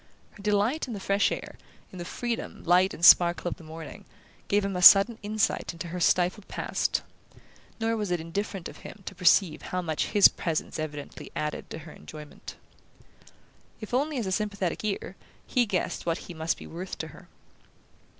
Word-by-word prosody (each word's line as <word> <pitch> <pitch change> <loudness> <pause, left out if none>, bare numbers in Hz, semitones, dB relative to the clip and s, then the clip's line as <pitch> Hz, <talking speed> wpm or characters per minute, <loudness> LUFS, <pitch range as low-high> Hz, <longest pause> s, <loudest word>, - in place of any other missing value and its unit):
Her 205 - -15
delight 210 +9 +1
in 235 - -5
the - - -5
fresh 200 +1 +1
air, - - -6 0.3
in 185 - -10
the 175 - -5
freedom, 240 +4 -4
light 180 +2 +4
and 170 - +1
sparkle 175 0 +7
of - - -6
the - - -14
morning, 160 -1 -10 0.4
gave 205 0 +2
him 195 -1 -3
a 180 - -2
sudden 200 +5 +8
insight 210 -3 -1
into 170 0 -7
her 180 +2 -5
stifled 180 +4 +2
past; - - -1 0.8
nor 225 0 0
was 210 -3 -2
it 175 -1 0
indifferent 190 +2 -4
to - - -6
him 200 - -12
to - - -6
perceive 180 -2 +3
how 185 - -3
much 160 -3 -1
his 205 -2 +7
presence 165 -1 -3
evidently 150 -2 -6
added 150 0 -4
to - - -6
her 160 - -10
enjoyment. 150 -1 -11 1.2
If 215 +1 -9
only 285 +3 0
as 235 - -2
a 190 - -2
sympathetic 200 -3 -2
ear, 195 -3 -3 0.3
he 245 -3 +1
guessed 185 -3 -2
what 165 0 +1
he 175 - -8
must 160 0 -1
be - - -10
worth 180 +3 -7
to - - -5
her. - - -15
190 Hz, 185 wpm, -27 LUFS, 170-210 Hz, 1.2 s, sudden